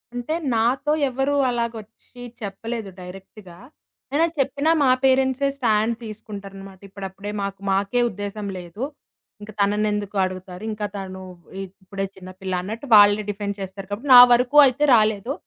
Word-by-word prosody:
అంటే, 245 Hz, +5 st, -3 dB, 0.2 s
నాతో 240 Hz, +6 st, +1 dB, 0.2 s
ఎవరూ 270 Hz, +3 st, -1 dB, 0.2 s
అలాగ 235 Hz, -1 st, -1 dB
వచ్చి 225 Hz, +3 st, -18 dB, 0.2 s
చెప్పలేదు 215 Hz, +2 st, -5 dB
డైరెక్ట్‌గా. 185 Hz, 0 st, -12 dB, 0.6 s
ఐనా 315 Hz, +3 st, +3 dB
చెప్పినా 280 Hz, +3 st, +1 dB
మా 265 Hz, -, +4 dB
పేరెంట్సే 265 Hz, +1 st, +2 dB
స్టాండ్ 225 Hz, -2 st, +1 dB
తీసుకుంటారనమాట. 200 Hz, -3 st, -9 dB
ఇప్పుడప్పుడే 195 Hz, +1 st, -7 dB
మాకు 200 Hz, -1 st, -4 dB
మాకే 200 Hz, +5 st, +1 dB
ఉద్దేశం 205 Hz, 0 st, -6 dB
లేదు, 180 Hz, +6 st, -7 dB, 0.6 s
ఇంక 210 Hz, +1 st, -9 dB
తనను 210 Hz, +1 st, +2 dB
ఎందుకు 205 Hz, -1 st, -4 dB
అడుగుతారు? 185 Hz, 0 st, -6 dB
ఇంకా 210 Hz, -1 st, -4 dB
తను 190 Hz, -1 st, -7 dB, 0.4 s
ఇ -, -, -3 dB, 0.2 s
ఇప్పుడే 195 Hz, +1 st, -4 dB
చిన్నపిల్ల 185 Hz, 0 st, -8 dB
అన్నట్టు 220 Hz, +8 st, -6 dB
వాళ్ళే 205 Hz, 0 st, +6 dB
డిఫెండ్ 200 Hz, 0 st, -4 dB
చేస్తారు. 190 Hz, 0 st, -7 dB
కాబట్టి 235 Hz, +8 st, -5 dB
నా -, -, +12 dB
వరకు 245 Hz, +4 st, +3 dB
అయితే 275 Hz, +2 st, +1 dB
రాలేదు. 215 Hz, +3 st, +1 dB
210 Hz, 140 wpm, -22 LUFS, 195-240 Hz, 0.6 s, నా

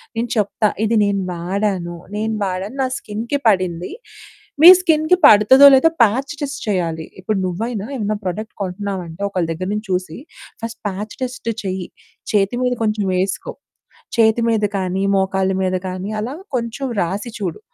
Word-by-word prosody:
నేను 235 Hz, +1 st, -2 dB
చెప్తా. 210 Hz, +1 st, +1 dB, 0.2 s
ఇది 225 Hz, +1 st, +2 dB
నేను 200 Hz, -1 st, 0 dB
వాడాను, 180 Hz, 0 st, -2 dB, 0.2 s
నేను 220 Hz, +1 st, -1 dB
వాడాను, 190 Hz, +5 st, -4 dB
నా 260 Hz, -, +1 dB
స్కిన్‌కి 230 Hz, +6 st, -4 dB
పడింది. 185 Hz, -, +1 dB, 0.7 s
మీ 335 Hz, -, +11 dB
స్కిన్‌కి 320 Hz, 0 st, +3 dB
పడతదో, 260 Hz, +4 st, +8 dB
లేదో 295 Hz, +5 st, +5 dB
ప్యాచ్ 260 Hz, +7 st, 0 dB
టెస్ట్ 280 Hz, -1 st, -4 dB
చెయ్యాలి. 165 Hz, -5 st, -1 dB
ఇప్పుడు 195 Hz, +2 st, -2 dB
నువ్వైనా 210 Hz, +3 st, -3 dB
ఏమన్నా 215 Hz, -2 st, -1 dB
ప్రొడక్ట్ 215 Hz, +4 st, -4 dB
కొంటన్నావంటే 190 Hz, -2 st, -5 dB
ఒకళ్ళ 180 Hz, -3 st, -1 dB
దగ్గర 185 Hz, +3 st, -4 dB
నుంచి 210 Hz, 0 st, -4 dB
చూసి, 180 Hz, -3 st, -2 dB, 0.4 s
ఫస్ట్ 230 Hz, 0 st, -6 dB
ప్యాచ్ 205 Hz, +2 st, -5 dB
టెస్ట్ 250 Hz, -2 st, -4 dB
చెయ్యి. 185 Hz, -2 st, -3 dB, 0.4 s
చేతి 200 Hz, +1 st, +1 dB
మీద 250 Hz, 0 st, +1 dB
కొంచెం 215 Hz, -1 st, 0 dB
వేసుకో, 185 Hz, +1 st, -2 dB, 0.6 s
చేతి 220 Hz, +1 st, +4 dB
మీద 220 Hz, -2 st, +2 dB
కానీ, 190 Hz, 0 st, -2 dB
మోకాళ్ళ 190 Hz, 0 st, +1 dB
మీద 185 Hz, 0 st, 0 dB
కానీ, 185 Hz, +2 st, -5 dB
అలా 245 Hz, +5 st, -4 dB, 0.2 s
కొంచెం 240 Hz, +3 st, -3 dB
రాసి 195 Hz, +7 st, -3 dB
చూడు. 180 Hz, -5 st, -4 dB
205 Hz, 150 wpm, -19 LUFS, 185-230 Hz, 0.7 s, మీ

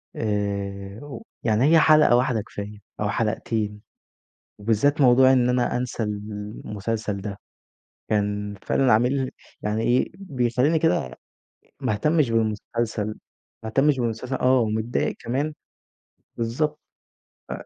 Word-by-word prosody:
آآ، 100 Hz, -1 st, -3 dB
و 145 Hz, +6 st, -8 dB, 0.2 s
يعني 110 Hz, +1 st, +2 dB
هي 165 Hz, +2 st, +6 dB
حلقة 155 Hz, -5 st, +6 dB
واحدة 125 Hz, -2 st, +2 dB
كفاية 105 Hz, 0 st, -8 dB, 0.2 s
أو 105 Hz, -, 0 dB
حلقتين، 105 Hz, -1 st, -1 dB, 0.8 s
وبالذات 115 Hz, +8 st, +2 dB
موضوع 130 Hz, 0 st, +6 dB
إن 125 Hz, -1 st, +3 dB
أنا 125 Hz, -1 st, +1 dB
أنسى 125 Hz, -2 st, -2 dB
المسلسل 105 Hz, 0 st, -4 dB
ده، 100 Hz, 0 st, -5 dB, 0.7 s
كان 105 Hz, -1 st, -1 dB
فعلًا 130 Hz, -2 st, +3 dB
عامل 130 Hz, +4 st, +2 dB, 0.3 s
يعني 105 Hz, +1 st, -1 dB
إيه 120 Hz, +2 st, +2 dB
بيخليني 140 Hz, -4 st, +1 dB
كده 110 Hz, -, +1 dB, 0.6 s
ما -, -, 0 dB
اهتمش 150 Hz, +5 st, +2 dB
بالمسلسل، 110 Hz, 0 st, -1 dB, 0.6 s
ما 110 Hz, -, -4 dB
اهتمش 135 Hz, +4 st, +3 dB
بالمسلسل، 120 Hz, +2 st, -2 dB
آه، 130 Hz, 0 st, +3 dB
ومتضايق 110 Hz, +1 st, 0 dB
كمان 140 Hz, +6 st, -2 dB, 0.8 s
بالضبط 150 Hz, +7 st, -1 dB, 0.7 s
ف -, -, -6 dB
115 Hz, 115 wpm, -24 LUFS, 105-130 Hz, 0.8 s, هي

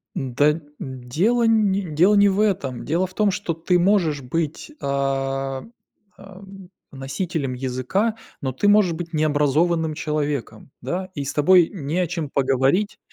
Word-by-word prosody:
Н-да, 135 Hz, +3 st, +2 dB, 0.3 s
н 130 Hz, -2 st, -7 dB
дело 220 Hz, -, +2 dB
не 210 Hz, -3 st, +3 dB
дело 180 Hz, +5 st, +3 dB
не 200 Hz, 0 st, +6 dB
в 195 Hz, +2 st, -1 dB
этом. 155 Hz, -, -1 dB
Дело 170 Hz, +5 st, 0 dB
в 185 Hz, -, -17 dB
том, 210 Hz, 0 st, +2 dB
что 190 Hz, -4 st, -3 dB
ты 175 Hz, +2 st, +1 dB
можешь 175 Hz, -6 st, +2 dB
быть, 155 Hz, -, -3 dB
а, 135 Hz, -1 st, -2 dB, 0.5 s
ам, 195 Hz, -1 st, -13 dB, 0.2 s
носителем 140 Hz, +1 st, -3 dB
языка, 130 Hz, -, -1 dB, 0.3 s
но 130 Hz, -1 st, -2 dB
ты 170 Hz, +11 st, 0 dB
можешь 205 Hz, -3 st, +5 dB
быть 170 Hz, 0 st, -6 dB
необразованным 155 Hz, +2 st, +1 dB
человеком, 145 Hz, -7 st, -3 dB
да. 185 Hz, +1 st, -3 dB
И 140 Hz, -, -3 dB
с 135 Hz, -, -3 dB
тобой 170 Hz, +3 st, +5 dB
не 155 Hz, -2 st, -3 dB
о 180 Hz, -, +1 dB
чем 165 Hz, -4 st, -4 dB
поговорить, 135 Hz, +10 st, +1 dB
160 Hz, 150 wpm, -22 LUFS, 135-190 Hz, 0.5 s, не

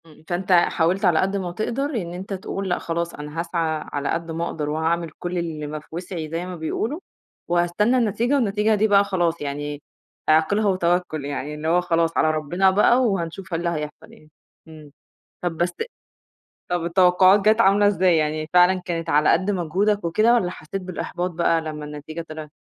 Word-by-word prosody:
امم، 155 Hz, -1 st, -18 dB
فأنت 180 Hz, +2 st, -2 dB
حاولت 175 Hz, +2 st, +3 dB
على 175 Hz, -3 st, +4 dB
قد 195 Hz, +1 st, 0 dB
ما 180 Hz, -3 st, -3 dB
تقدَر 230 Hz, +8 st, -2 dB
إن 190 Hz, -, -4 dB
أنت 190 Hz, +3 st, -6 dB
تقول 195 Hz, 0 st, -4 dB
لأ، 175 Hz, -, 0 dB
خلاص 170 Hz, 0 st, -3 dB
أنا 150 Hz, +2 st, -7 dB
هاسعى 165 Hz, -2 st, -1 dB
على 145 Hz, 0 st, -2 dB
قد 165 Hz, 0 st, -2 dB
ما 165 Hz, +1 st, -2 dB
أقدَر 150 Hz, -3 st, -3 dB
وهاعمل 165 Hz, +2 st, -1 dB
كلّ 175 Hz, 0 st, -3 dB
اللي 160 Hz, -3 st, -3 dB
ما 155 Hz, +1 st, -5 dB
في 150 Hz, -, -21 dB
وِسعي 170 Hz, -1 st, -5 dB
زي 165 Hz, +3 st, -3 dB
ما 180 Hz, 0 st, -6 dB
بيقولوا 220 Hz, -, -3 dB, 0.5 s
وهاستنى 175 Hz, +8 st, +2 dB
النتيجة 235 Hz, +2 st, +1 dB
والنتيجة 215 Hz, -3 st, +2 dB
دي 215 Hz, +1 st, +2 dB
بقى 200 Hz, -1 st, +5 dB
خلاص 175 Hz, -5 st, -1 dB
يعني، 145 Hz, 0 st, -4 dB, 0.5 s
"اعقِلها 160 Hz, +8 st, +3 dB
وتوكّل" 175 Hz, -5 st, 0 dB
يعني 145 Hz, +1 st, -4 dB
اللي 150 Hz, +1 st, -5 dB
هو 175 Hz, +2 st, +3 dB
خلاص 165 Hz, -2 st, 0 dB
على 155 Hz, -, +3 dB
ربنا 175 Hz, +5 st, +1 dB
بقى 240 Hz, +6 st, +4 dB
وهنشوف 190 Hz, -4 st, -2 dB
إيه 165 Hz, -, 0 dB
اللي 170 Hz, 0 st, -1 dB
هيحصَل 150 Hz, -3 st, -6 dB
يعني. 155 Hz, -, -19 dB, 0.4 s
امم. 155 Hz, -2 st, -13 dB, 0.5 s
طَب 175 Hz, -2 st, -2 dB
بس 175 Hz, +1 st, 0 dB, 1.0 s
طَب 175 Hz, -1 st, -1 dB
التوقعات 185 Hz, +2 st, +5 dB
جات 215 Hz, +3 st, +4 dB
عاملة 205 Hz, 0 st, +4 dB
إزاي، 185 Hz, -4 st, +3 dB
يعني 155 Hz, 0 st, -1 dB
فعلًا 180 Hz, +1 st, +5 dB
كانت 165 Hz, -2 st, -3 dB
على 150 Hz, 0 st, +4 dB
قد 185 Hz, +4 st, +2 dB
مجهودك 200 Hz, +4 st, 0 dB
وكده 215 Hz, +8 st, +3 dB
والّا 195 Hz, -7 st, +1 dB
حسّيت 185 Hz, +3 st, -6 dB
بالإحباط 180 Hz, 0 st, -4 dB
بقى 165 Hz, -1 st, +1 dB
لما 155 Hz, -1 st, -6 dB
النتيجة 150 Hz, +3 st, -7 dB
طلعِت؟ 155 Hz, -1 st, -8 dB
175 Hz, 185 wpm, -23 LUFS, 160-190 Hz, 1.0 s, بقى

